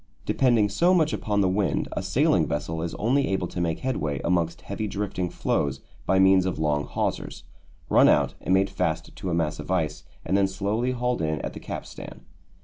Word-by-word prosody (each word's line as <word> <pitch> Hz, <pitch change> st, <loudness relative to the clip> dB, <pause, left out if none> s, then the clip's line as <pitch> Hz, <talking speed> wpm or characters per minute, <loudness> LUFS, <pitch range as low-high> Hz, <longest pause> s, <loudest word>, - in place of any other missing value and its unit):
Depending 120 Hz, -6 st, +3 dB
so 170 Hz, -, +3 dB
much 160 Hz, -3 st, +2 dB
upon 105 Hz, -1 st, 0 dB
the 95 Hz, -, +3 dB
wind, 95 Hz, +1 st, 0 dB
a -, -, -3 dB
sailing -, -, +2 dB
vessel 80 Hz, +2 st, -3 dB
is 85 Hz, 0 st, -4 dB
only 135 Hz, +5 st, +1 dB
able 95 Hz, -2 st, -1 dB
to 85 Hz, -, -4 dB
make 80 Hz, -2 st, -1 dB
headway 80 Hz, -, -2 dB
amongst 85 Hz, -1 st, 0 dB
heavy 105 Hz, +2 st, -4 dB
drifting 100 Hz, -3 st, -3 dB
floes 70 Hz, -4 st, -1 dB, 0.3 s
by 95 Hz, -, +3 dB
means 95 Hz, -1 st, +5 dB
of 95 Hz, -, -2 dB
long 75 Hz, -2 st, 0 dB
hawsers, -, -, -3 dB, 0.4 s
run -, -, +6 dB
out -, -, +3 dB
and -, -, -3 dB
made 95 Hz, +1 st, +3 dB
fast -, -, -2 dB
to 95 Hz, -, -5 dB
a 85 Hz, -, 0 dB
mass 80 Hz, -3 st, -1 dB
of 75 Hz, -, -8 dB
ice 80 Hz, -5 st, -1 dB, 0.2 s
and 95 Hz, -, 0 dB
then 100 Hz, -1 st, +4 dB
slowly 100 Hz, +6 st, -1 dB
hauled 125 Hz, -2 st, -1 dB
in 80 Hz, -2 st, -1 dB
at -, -, -5 dB
the -, -, -8 dB
capstan. -, -, -8 dB
95 Hz, 200 wpm, -25 LUFS, 80-105 Hz, 0.4 s, run